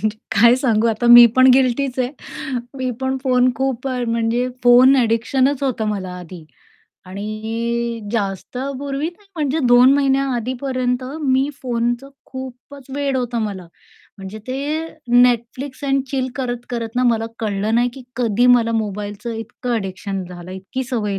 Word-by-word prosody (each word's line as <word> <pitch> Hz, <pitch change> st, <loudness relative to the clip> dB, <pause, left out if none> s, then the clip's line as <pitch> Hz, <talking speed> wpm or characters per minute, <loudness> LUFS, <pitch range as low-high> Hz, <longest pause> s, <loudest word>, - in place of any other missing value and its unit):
म्हणजे 215 Hz, -, +1 dB, 0.3 s
काय 235 Hz, +1 st, +7 dB
सांगू 235 Hz, -4 st, +1 dB
आता 225 Hz, +2 st, -1 dB
मी 240 Hz, 0 st, +10 dB
पण 255 Hz, 0 st, +7 dB
गिल्टीच 260 Hz, 0 st, +1 dB
आहे. 250 Hz, -1 st, 0 dB, 0.7 s
मी 255 Hz, -1 st, -1 dB
पण 265 Hz, 0 st, -1 dB
फोन 255 Hz, -1 st, +3 dB
खूप 265 Hz, 0 st, -2 dB
अ, 255 Hz, -1 st, -2 dB
म्हणजे 230 Hz, +2 st, 0 dB
फोन 250 Hz, +2 st, +7 dB
ॲडिक्शनच 255 Hz, +3 st, +1 dB
होतं 255 Hz, -5 st, -1 dB
मला 195 Hz, -3 st, -3 dB
आधी 175 Hz, -2 st, -10 dB, 0.6 s
आणि 225 Hz, +4 st, -3 dB
जास्त 200 Hz, +1 st, -3 dB, 0.2 s
पूर्वी 280 Hz, +2 st, -3 dB
नाही 405 Hz, +4 st, -25 dB
म्हणजे 300 Hz, 0 st, 0 dB
2 245 Hz, +2 st, +7 dB
महिन्याआधीपर्यंत 260 Hz, -2 st, 0 dB, 0.2 s
मी 265 Hz, 0 st, +2 dB
फोनचं 240 Hz, +1 st, -1 dB, 0.2 s
खूपच 260 Hz, +1 st, -10 dB
वेड 280 Hz, -2 st, -1 dB
होतं 245 Hz, -2 st, -2 dB
मला. 195 Hz, -4 st, -5 dB, 0.5 s
म्हणजे 195 Hz, +2 st, -8 dB
ते 255 Hz, +1 st, -3 dB, 0.7 s
Netflix 250 Hz, +4 st, -2 dB
अँड 270 Hz, 0 st, +2 dB
चिल 260 Hz, -2 st, -1 dB
करत-करत 245 Hz, -2 st, -4 dB
ना 250 Hz, -, +2 dB
मला 225 Hz, -1 st, -1 dB
कळलं 210 Hz, 0 st, -1 dB
नाही 240 Hz, +1 st, +3 dB
की 270 Hz, -, -10 dB
कधी 240 Hz, -1 st, +2 dB
मला 230 Hz, -1 st, 0 dB
मोबाईलचं 210 Hz, +1 st, -3 dB
इतकं 225 Hz, +2 st, -5 dB
ॲडिक्शन 195 Hz, -2 st, -4 dB
झालं 175 Hz, 0 st, -10 dB
आहे, 185 Hz, -, -6 dB
इतकी 255 Hz, +8 st, -5 dB
सवय 210 Hz, -6 st, -2 dB
245 Hz, 145 wpm, -20 LUFS, 220-260 Hz, 0.7 s, मी